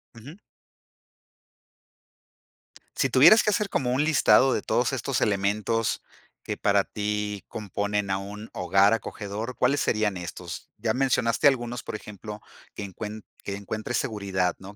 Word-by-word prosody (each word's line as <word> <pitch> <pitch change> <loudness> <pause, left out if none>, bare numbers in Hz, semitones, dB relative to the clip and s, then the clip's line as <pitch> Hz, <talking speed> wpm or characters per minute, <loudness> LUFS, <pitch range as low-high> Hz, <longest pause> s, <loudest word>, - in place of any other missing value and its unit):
Ujú. 140 - -11 2.6
Si - - +1
tuvieras 220 - +7
que 210 - +2
hacer 210 -1 0
como 125 -8 0
un 130 +4 +2
listado 135 -4 +5
de - - 0
todos - - 0
estos - - -1
elementos 105 +3 0 0.4
que - - -4
para 100 -1 +3
ti 105 -1 -3
componen 105 -1 -2
a 95 - +1
un 105 +3 -8
hogar 95 +3 +3
acogedor, 110 +2 -4
¿cuáles 140 +3 +2
serían 105 -3 +1
estos? 90 0 -7
Ya 110 0 0
mencionaste 130 -1 +2
algunos, 120 -3 0
por - - -5
ejemplo, 105 0 -8 0.3
que 100 - -6
encuen 105 +2 -7 0.2
que 100 - -4
encuentre 110 +4 -5
seguridad, 95 -6 -1
¿no? 100 +2 -11
105 Hz, 140 wpm, -26 LUFS, 100-120 Hz, 2.6 s, tuvieras